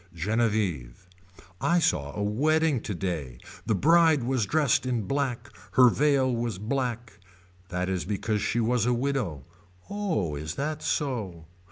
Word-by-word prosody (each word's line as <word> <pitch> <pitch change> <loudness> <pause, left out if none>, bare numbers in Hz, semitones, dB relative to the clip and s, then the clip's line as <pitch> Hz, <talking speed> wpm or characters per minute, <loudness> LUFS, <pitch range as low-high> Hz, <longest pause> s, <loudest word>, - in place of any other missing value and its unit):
Genevieve. 95 - -1 0.5
I 170 - +3
saw 70 - 0
a 105 - -1
wedding 150 +5 +2
today. 85 - -4 0.3
The 110 - +2
bride 160 - +4
was 125 -4 0
dressed 145 -3 +2
in 120 -4 0
black. 125 0 -2 0.2
Her 125 -1 +7
veil 135 -1 +2
was 115 -3 -2
black. 120 0 -3 0.5
That 90 0 -2
is 95 -3 -1
because 105 +2 -2
she 120 - 0
was 120 0 +1
a 125 - +2
widow. 120 - -2 0.5
Oh 175 - -1
is 75 +3 -5
that 150 +2 -3
so. 105 - -2
115 Hz, 140 wpm, -27 LUFS, 95-140 Hz, 0.5 s, Her